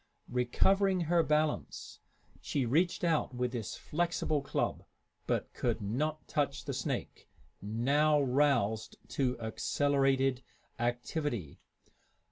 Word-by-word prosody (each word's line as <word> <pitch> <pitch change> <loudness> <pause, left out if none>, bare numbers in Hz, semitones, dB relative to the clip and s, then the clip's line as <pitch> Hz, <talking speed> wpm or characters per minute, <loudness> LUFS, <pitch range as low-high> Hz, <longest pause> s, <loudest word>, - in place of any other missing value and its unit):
Recovering 185 +10 +2
her 170 +1 +3
balance, 150 -1 -1 0.4
she 135 -3 -1
reached 170 +11 +1
out 160 -6 +1
with 125 0 -1
this 115 -5 -4
flexible 165 -2 -1
club, 140 - -2 0.4
but - - -1
could 120 -2 -1
not 145 +10 -2
touch 140 -1 -1
the - - -3
snake, - - -4 0.3
now 140 +9 +2
roused 130 -6 +1
to 125 -3 0
accelerated 135 +3 +1 0.4
activity. 120 - -2
140 Hz, 100 wpm, -32 LUFS, 120-155 Hz, 0.4 s, her